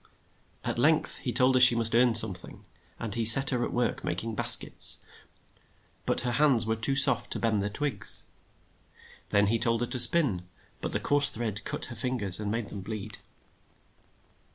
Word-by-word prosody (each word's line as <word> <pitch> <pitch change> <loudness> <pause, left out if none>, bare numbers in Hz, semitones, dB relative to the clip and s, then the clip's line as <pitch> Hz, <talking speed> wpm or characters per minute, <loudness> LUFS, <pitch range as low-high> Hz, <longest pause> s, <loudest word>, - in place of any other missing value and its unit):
At - - -5
length 155 +4 -1
he 125 - -6
told 125 +3 +2
her 130 - +1
she 125 -1 +6
must 115 -1 +2
earn 120 0 +1
some 110 -3 +5
thing, 90 - -10 0.3
and 115 -4 -7
he 115 - -3
set 135 +5 +7
her 125 -2 -3
at - - -5
work 120 0 -4
mak 85 +3 -4
ing 115 0 -7
bas - - +3
kets, - - +1 1.1
but - - -1
her 125 - -4
hands 135 -3 +1
were 110 0 -3
too 115 +5 +1
soft 140 - +3
to - - -6
bend 110 -3 -2
the 100 - -4
hard 105 - -10
twigs. 145 -2 -2 1.1
Then 100 0 +1
he 115 +3 -2
told 115 0 -2
her - - -1
to 125 - -5
spin, 120 - +3 0.3
but - - -7
the - - -2
coarse 145 0 +4
thread 110 -2 -6
cut - - -4
her 120 - -9
fin 125 +3 -4
gers 100 -4 +3
and 105 -1 -6
made 115 -1 -5
them 100 - -9
bleed. 105 0 -9
115 Hz, 200 wpm, -26 LUFS, 110-125 Hz, 1.1 s, set